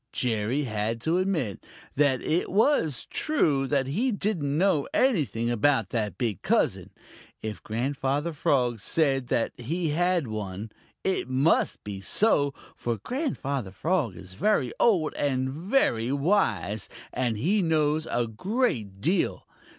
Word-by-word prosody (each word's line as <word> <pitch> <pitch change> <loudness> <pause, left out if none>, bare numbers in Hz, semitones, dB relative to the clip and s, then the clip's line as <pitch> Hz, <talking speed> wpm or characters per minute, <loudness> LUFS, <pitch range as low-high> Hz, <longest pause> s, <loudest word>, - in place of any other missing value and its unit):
Jerry 120 +3 0
had 110 -1 -2
to 165 +7 +1
admit 165 - -1 0.3
that 135 -2 +2
it 170 +3 0
was 195 - +2
true 150 - +1
that 140 -1 +1
he 215 - 0
didn't 175 -9 -1
know 170 -5 +2
anything 145 - +2
about 120 -3 +2
that 105 -6 -2
big 110 -7 -2
cousin. - - +1 0.5
If 110 -1 -5
Grandfather 135 +7 -1
Frog 125 -6 +1
said 135 0 +1
that 115 - 0
he 160 +7 -2
had 175 +1 +1
one, 105 -1 -5 0.3
it 190 -9 0
must 135 +5 +2
be 100 -2 -6
so, 145 - +3 0.2
for 120 -1 -2
Grandfather 140 - -3
Frog 135 - -1
is 95 0 -11
very 130 - +1
old 175 -10 +3
and 130 -2 0
very 150 - +1
wise, 120 - +1 0.2
and 120 -4 0
he 190 - +2
knows 155 -2 +1
a 120 - +1
great 115 - -2
deal. 175 +7 0
140 Hz, 135 wpm, -27 LUFS, 115-170 Hz, 0.5 s, so